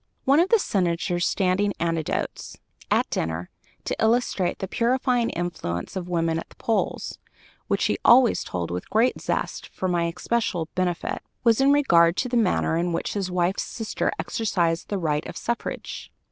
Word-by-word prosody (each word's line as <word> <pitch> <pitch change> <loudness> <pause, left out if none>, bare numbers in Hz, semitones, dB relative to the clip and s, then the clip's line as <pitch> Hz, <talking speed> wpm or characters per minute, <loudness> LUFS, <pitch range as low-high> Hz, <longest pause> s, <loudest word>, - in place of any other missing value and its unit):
One 280 +3 +5
of 355 +3 +3
the 460 - +6
Senator's 175 - 0
standing 195 +2 +1
anecdotes, 165 -2 -2 0.3
at - - +2
dinner, 80 +2 -2 0.3
to - - -1
illustrate 220 -5 +1
the 190 - -4
purifying 245 +2 +1
influence 165 - -4
of 180 -1 -4
women 165 -2 0
at - - -9
the - - -18
polls, 225 -2 -2 0.5
which - - +1
he - - 0
always 240 -1 +6
told 85 -2 -4
with 90 0 -5
great 230 +4 +2
zest - - -2
for 190 - -4
my 175 -2 +1
especial 175 -1 -1
benefit, 180 -2 -1 0.2
was 230 +1 +4
in 275 +1 +5
regard 170 -12 +4
to 250 - 0
the 245 - -1
manner 200 -7 +2
in 175 0 0
which - - -2
his 195 -3 -2
wife's 180 +1 0
sister 225 -3 -2
exercised 175 -7 -1
the 205 - -1
right 150 -4 -1
of - - -7
suffrage. 235 0 -4
185 Hz, 165 wpm, -25 LUFS, 170-230 Hz, 0.5 s, the